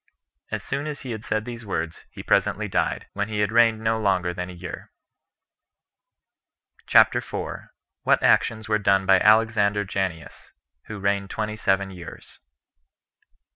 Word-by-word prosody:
As - - -4
soon 140 +2 -3
as 150 -2 -6
he 130 - -6
had 110 -1 -6
said 110 -1 -2
these 120 -1 -7
words, 85 -5 -4
he - - -10
presently - - +1
died, - - -1
when 100 +1 -2
he 105 -1 -1
had 105 0 +1
reigned 115 -1 +4
no 110 0 0
longer 95 -4 +1
than 90 +1 -5
a - - -8
year. 90 +1 -9 2.0
CHAPTER - - +5
4. - - -6 0.3
What - - +2
Actions 110 -1 +2
Were 105 -1 +1
Done 95 -1 +2
By 95 -1 +5
Alexander 105 -1 +3
Janneus, 95 -4 -5 0.3
Who 110 - -7
Reigned 100 0 -1
Twenty 105 +1 -3
Seven 95 -2 0
Years. 90 -2 -11
105 Hz, 150 wpm, -24 LUFS, 95-110 Hz, 2.0 s, CHAPTER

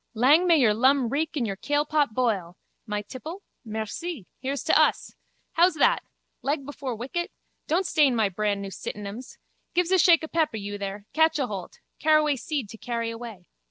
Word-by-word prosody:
Lang 290 +10 +5
may 335 -2 +6
your 235 -7 +4
lum 260 +2 +3
reek 310 +5 -1
and 260 -6 0
your 200 -3 -3
kailpot 290 0 0
boil! 200 -8 0 0.3
My 210 0 -2
tipple. 320 - -8 0.2
Merci. 220 - -5
Here's 275 +2 -3
to - - +3
us. - - +3 0.4
How's 345 +1 +4
that? 475 +11 +3 0.4
Leg 280 0 -1
before 280 -3 -5
wicket. 270 +10 -4 0.4
Don't 345 +5 +1
stain 295 -7 +3
my 220 -3 +3
brandnew 200 0 -2
sitinems. 210 +6 -7 0.4
Give's 355 0 +2
a 375 - +5
shake 335 -1 +6
of 315 - -6
peppe, 315 -9 0
you 205 0 -5
there. 200 +1 -5
Catch 320 +1 +3
aholt. 210 -10 -4 0.2
Caraway 305 -1 +4
seed 270 -2 -3
to 225 - -11
carry 230 -2 -3
away. 225 -5 -9
260 Hz, 170 wpm, -26 LUFS, 215-310 Hz, 0.4 s, may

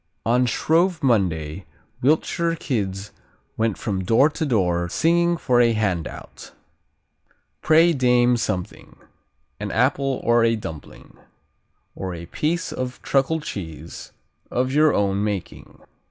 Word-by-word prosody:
On 125 +2 +2
Shrove 165 +6 +1
Monday 90 - 0 0.3
Wiltshire 165 +4 +1
kids 100 - -3 0.4
went 110 -2 0
from 95 -4 -3
door 115 +10 +4
to 160 +1 -3
door 90 -7 +1
singing 170 - +2
for 125 -5 +2
a 115 -1 +3
handout: 95 -7 -4 1.1
Pray, 165 +2 +5
dame, 125 -2 +3
something, 95 -6 -4 0.6
An 105 0 -4
apple 135 +2 +1
or 120 0 +3
a 115 0 +3
dumpling, 80 -8 -10 0.8
Or 95 -2 -5
a 85 0 -8
piece 160 - -2
of 125 -1 -5
Truckle 140 +4 +1
cheese 80 - -8 0.4
Of 130 +1 -1
your 155 +1 +4
own 100 0 0
making. 105 -4 -5
120 Hz, 120 wpm, -22 LUFS, 95-145 Hz, 1.1 s, Pray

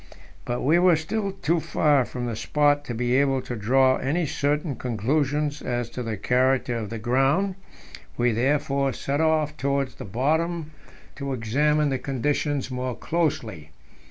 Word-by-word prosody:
But 120 0 -2
we 160 +6 +4
were 180 -1 +5
still 195 +6 -2
too 175 -3 0
far 145 -4 +2
from 125 0 -5
the 120 -2 -3
spot 145 +4 +2
to 120 - -4
be 120 +2 0
able 135 -1 +2
to 125 - -5
draw 130 +5 +3
any 160 +6 0
certain 145 0 -1
conclusions 145 +6 -1
as 120 -1 -3
to 125 - -5
the 115 -3 -3
character 125 +3 +1
of 110 -3 -4
the 115 - -5
ground; 135 - +1 0.6
we 120 0 +2
therefore 140 +3 +1
set 140 +3 -2
off 155 -2 +1
towards 140 -1 -1
the - - -9
bottom 155 - -1 0.5
to 140 -1 -3
examine 145 +6 +1
the 135 -1 -1
conditions 140 +1 -1
more 125 -1 -3
closely. 115 - -2
140 Hz, 155 wpm, -25 LUFS, 125-150 Hz, 0.6 s, were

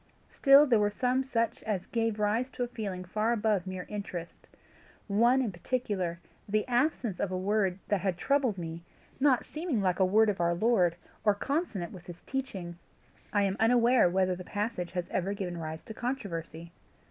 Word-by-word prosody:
Still 275 +1 +7
there 240 -6 +4
were 205 0 +3
some 250 +5 0
such 230 -3 -1
as 205 -5 -2
gave 225 -2 -1
rise 215 +5 +1
to 245 - -2
a - - -2
feeling 200 -6 -5
far 215 +5 0
above 210 -4 0
mere 185 -1 -5
interest 185 -5 -7 0.6
one 235 +6 +4
in 225 - -2
particular, 185 -3 -2 0.3
the 215 +3 +1
absence 245 - 0
of 190 - -1
a 185 - -1
word 195 -1 +1
that 205 -3 +1
had 190 -2 -1
troubled 265 -3 +1
me, 165 -1 -5 0.4
not 265 -3 +3
seeming 310 -6 -2
like 185 -2 +1
a - - +5
word 215 +4 +4
of 195 -4 -1
our 170 0 +2
Lord, 180 -4 +3 0.3
or 210 -2 +4
consonant 230 - -2
with 175 -2 -12
his 175 -1 -9
teaching. 195 -11 -5 0.5
I 205 -1 +2
am 195 0 0
unaware 240 -2 +5
whether 185 0 +1
the 180 - -8
passage 205 -3 -3
has 180 -1 -2
ever 190 +2 -1
given 180 -3 -4
rise 160 0 -6
to 220 - -8
controversy." 170 -9 -5
205 Hz, 180 wpm, -30 LUFS, 180-240 Hz, 0.6 s, Still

